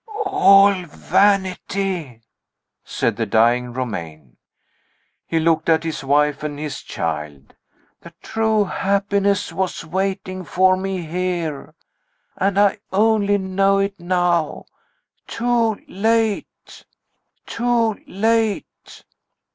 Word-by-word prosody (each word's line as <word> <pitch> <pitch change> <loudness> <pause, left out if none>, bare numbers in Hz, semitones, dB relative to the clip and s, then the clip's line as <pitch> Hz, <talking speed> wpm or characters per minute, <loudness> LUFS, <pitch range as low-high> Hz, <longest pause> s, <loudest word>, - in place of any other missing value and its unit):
"All 200 - +6
vanity!" 190 - 0 0.6
said 115 - -2
the 115 -2 -1
dying 120 +3 +2
Romayne. 85 - -6 0.9
He 165 - 0
looked 160 0 +1
at 160 0 +3
his 160 -3 -4
wife 145 +1 +2
and 150 -1 -5
his 150 -1 -5
child. 75 -3 -5 0.5
"The 170 - -12
true 220 -1 +1
happiness 200 +1 0
was 190 -3 -3
waiting 185 +1 -3
for 185 +2 +3
me 190 -2 -4
here. 170 -3 -3 0.6
And 195 +1 0
I 205 +1 +3
only 205 0 +2
know 195 +1 +1
it 195 0 -1
now. 175 -2 0 0.6
Too 230 -2 0
late. 220 +1 -2 0.6
Too 230 -2 0
late." 220 +1 -2
185 Hz, 100 wpm, -20 LUFS, 155-200 Hz, 0.9 s, All